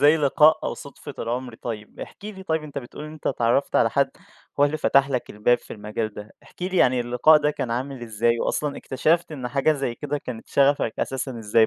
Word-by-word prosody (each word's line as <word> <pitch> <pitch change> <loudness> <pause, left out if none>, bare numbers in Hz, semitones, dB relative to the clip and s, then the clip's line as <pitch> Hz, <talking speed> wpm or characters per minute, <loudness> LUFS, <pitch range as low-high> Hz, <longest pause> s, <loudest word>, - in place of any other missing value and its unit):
زي 145 +3 +6
لقاء، 150 +1 +5
أو - - -2
صُدفة 140 -1 -10
العمر. 120 +1 -3
طيب، 110 -2 -7
احكِ - - -10
لي 200 -3 -7
طيب 160 -4 -1
أنت 145 -2 -6
بتقول 130 +3 -9
إن 155 - -8
أنت 155 - -10
اتعرّفت 120 +2 +1
على - - +4
حد 140 -1 +2 0.5
هو 145 - +8
اللي 150 +2 0
فتح 140 -2 +3
لك 125 -2 -2
الباب 110 +4 +2
في - - -12
المجال 105 0 -4
ده، 105 +1 -9
احكِ - - -14
لي 185 0 -1
يعني 125 -5 +4
اللقاء 125 +6 +5
ده 150 0 +1
كان 125 -5 -4
عامل 130 +1 -3
إزاي 115 +1 +1
وأصلًا 150 -1 -1
اكتشفت 160 +5 0
إن 130 -4 -4
حاجة 140 +4 +2
زي 135 -5 -2
كده 145 +4 -3
كانت 120 -4 -8
شغفك 140 -4 +3
أساسًا 130 -2 -3
إزاي 110 +1 +3
135 Hz, 215 wpm, -24 LUFS, 120-150 Hz, 0.5 s, هو